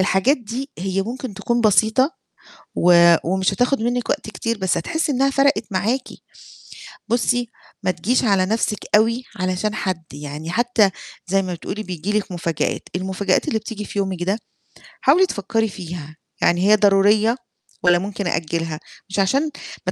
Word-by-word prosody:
الحاجات 190 +9 +3
دي 250 +4 -6
هي 190 +1 -1
ممكن 240 +1 -6
تكون 235 +5 0
بسيطة 220 - +3 0.6
و 170 -1 +6
ومش 190 +2 +1
هتاخد 250 +4 +1
منِّك 245 +1 -1
وقت 215 - -2
كتير 230 +1 -3
بس 190 -2 0
هتحسّي 305 - -1
إنّها 270 +2 +2
فرقِت 275 -3 +2
معاكِ. 215 +7 -1 1.0
بُصّي 245 +1 +1 0.3
ما 185 - +1
تجيش 205 +10 0
على 195 -4 +3
نَفْسِك 215 0 0 0.2
أوي 230 +4 +2
علشان 185 +3 -1
حد، 185 -6 -3
يعني 150 +3 -6
حتّى 225 -1 +3 0.4
زي 195 +1 +2
ما 185 -2 -3
بتقولي 195 +5 -5
بييجي 185 0 -4
لِك 200 - -6
مفاجآت، 170 -3 -2
المفاجآت 190 +1 0
اللي 220 - +1
بتيجي 215 -1 -6
في 205 - -6
يومِك 190 -3 -1
ده، 195 +4 0 0.6
حاولي 330 +8 +5
تفكّري 225 - -1
فيها، 170 -5 -8 0.3
يعني 175 +3 +3
هي 215 - +8
ضرورية 210 +2 +4 0.5
والَّا 175 0 +5
ممكن 200 0 -4
أأجّلها، 165 -1 -2 0.3
مش 195 - -2
عشان 195 +9 +3 0.5
ما - - +2
200 Hz, 155 wpm, -21 LUFS, 185-230 Hz, 1.0 s, هي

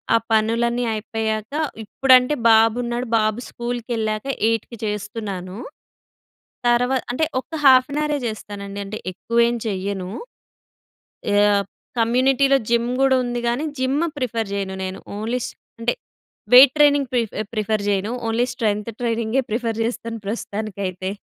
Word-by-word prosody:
ఆ - - +7
పనులన్నీ 230 +2 +2
అయిపోయాక 220 +1 -3 0.3
ఇప్పుడంటే 255 +4 +4
బాబు 225 0 +5
ఉన్నాడు. 240 +1 -3
బాబు 215 +1 0
స్కూల్‌కెళ్ళాక 235 -2 -3 0.2
8కి 230 +1 -2
చేస్తున్నాను. 205 -3 -4 1.1
తర్వ 240 +1 +3 0.2
అంటే 255 +6 -1 0.2
ఒక్క 260 - -12
హాఫ్ 255 -1 +7
యాన్ 285 - -3
హవరే 300 -1 0
చేస్తానండి. 205 -2 -6
అంటే 210 +2 -6
ఎక్కువేం 235 +5 +1
చెయ్యను. 195 -2 -3 1.3
ఆహ్, 205 -1 +4 0.4
కమ్యూనిటీలో 265 +4 +3
జిమ్ 235 0 +2
గూడా 270 -1 +4
ఉంది 240 0 -2
కానీ 250 +6 -1
జిమ్ 260 +2 +1 0.2
ప్రిఫర్ 230 -5 -2
చేయను 195 -1 -3
నేను. 190 0 -5 0.2
ఓన్లీ 225 +4 -2 0.4
అంటే 230 - +1 0.6
వెయిట్ 260 +1 +10
ట్రైనింగ్ 285 -3 +4
ప్రిఫ్ 235 -4 0 0.2
ప్రిఫర్ 215 -1 -1
చేయను. 200 +2 0 0.2
ఓన్లీ 230 +2 +1
స్ట్రెంత్ 215 -2 -1
ట్రైనింగే 230 +1 0
ప్రిఫర్ 225 0 -1
చేస్తాను 230 0 -4
ప్రస్తుతానికైతే. 200 -4 -4
230 Hz, 120 wpm, -22 LUFS, 210-245 Hz, 1.3 s, వెయిట్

